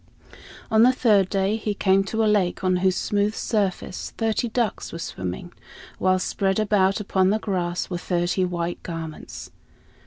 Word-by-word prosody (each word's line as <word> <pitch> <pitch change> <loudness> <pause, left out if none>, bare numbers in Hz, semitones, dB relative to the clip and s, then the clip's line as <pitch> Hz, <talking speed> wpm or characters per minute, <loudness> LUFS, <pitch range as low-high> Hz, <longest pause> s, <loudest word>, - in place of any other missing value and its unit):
On 220 0 +5
the 245 +2 +7
third 210 -7 +3
day 195 +2 +1
he 210 -2 -3
came 195 0 +3
to 220 +3 -1
a - - +3
lake 200 -4 +1
on 185 -1 +2
whose 185 0 +2
smooth 205 +3 0
surface 200 -4 -2
thirty 225 +1 0
ducks 230 -3 -2
were - - -6
swimming, 95 - -5 0.5
while 185 0 +3
spread 190 +1 0
about 200 -2 +2
upon 190 -2 +1
the 210 - +2
grass 180 -5 -2
were 175 -2 -4
thirty 175 +1 0
white 175 -1 -3
garments. 165 -2 -7
190 Hz, 160 wpm, -24 LUFS, 180-210 Hz, 0.5 s, the